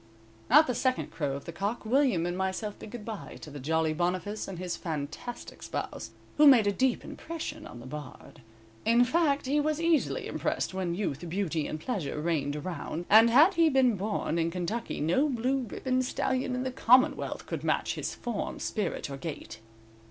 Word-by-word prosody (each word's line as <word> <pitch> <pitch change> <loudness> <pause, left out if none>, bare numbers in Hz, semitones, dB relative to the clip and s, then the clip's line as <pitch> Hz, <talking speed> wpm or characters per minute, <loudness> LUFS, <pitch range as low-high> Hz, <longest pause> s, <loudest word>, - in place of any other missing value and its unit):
"_ - - +6
At 305 +1 +9
the 250 - -1
second 255 +2 0
crow 145 -4 -2
of 140 - -8
the - - -5
cock 200 +7 -3
William 240 - +2
and 175 0 -2
myself 190 +3 -3
bid - - -9
good 225 -2 -8
bye 220 -3 -7
to 150 - -9
the 145 - -7
jolly 160 +3 +1
Boniface 180 +5 -2
and 190 - -6
his 180 -1 -3
fantastic 160 +10 -6
spouse, - - -5 0.3
who 300 0 +7
made 250 -6 +7
a 205 - +3
deep 260 +4 0
impression 315 -2 -6
on 120 - -10
the 120 - -11
Bard. 145 +1 -9 0.4
In 235 +2 +5
fact, 290 0 +2
he 285 +3 +2
was 305 +1 0
easily 330 -3 +1
impressed - - -2
when 185 -2 -2
youth, 175 -4 -3
beauty 170 -4 -1
and 155 - -4
pleasure 160 - -3
reigned 150 -3 -1
around, 170 +1 -5
and 220 +2 +8
had 300 +11 +6
he 335 -2 +4
been 260 -5 +4
born 195 -4 -1
in 165 0 +1
Kentucky, 185 +7 -3
no 180 - +2
blue 260 +1 0
ribbon 255 +3 0
stallion 255 0 -1
in 250 - -2
the 260 - -2
commonwealth 255 +3 +3
could - - -5
match - - 0
his - - -4
form, 235 -4 -4
spirit 210 - -2
or 140 -1 -6
gait. 160 -5 -7
210 Hz, 190 wpm, -29 LUFS, 165-255 Hz, 0.4 s, At